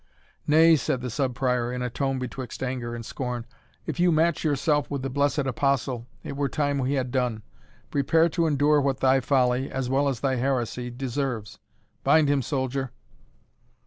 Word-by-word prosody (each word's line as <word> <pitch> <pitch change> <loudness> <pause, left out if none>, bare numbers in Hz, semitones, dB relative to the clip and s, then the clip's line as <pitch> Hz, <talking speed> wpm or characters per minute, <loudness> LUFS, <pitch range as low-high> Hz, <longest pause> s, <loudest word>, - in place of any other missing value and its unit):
"Nay," 160 +2 +6
said 130 -2 -1
the 125 -1 -4
Sub 125 +1 -1
Prior, 125 -2 0
in 125 0 -3
a 125 - -1
tone 135 +1 -1
betwixt 130 0 -5
anger 125 -2 -3
and 115 -1 -7
scorn, 125 -2 -4 0.4
"if - - -4
you 175 0 +4
match 160 0 +2
yourself 145 0 +1
with 140 -2 -3
the 135 - -3
blessed 145 +1 +1
Apostle, 135 -2 0 0.2
it - - -6
were 140 0 -1
time 145 -2 0
we 130 +1 0
had 130 -3 -1
done 125 -4 -1 0.5
prepare 160 +4 +3
to 170 0 +1
endure 145 0 +3
what 135 -1 0
thy 135 0 +4
folly, 130 0 +1
as 130 -1 -3
well 140 +1 +2
as 130 -4 -4
thy 135 -2 +1
heresy, 125 -1 -1
deserves. 125 -3 -4 0.4
Bind 155 -2 +4
him, 140 -1 +2
soldier." 130 0 -2
135 Hz, 175 wpm, -26 LUFS, 125-145 Hz, 0.5 s, Nay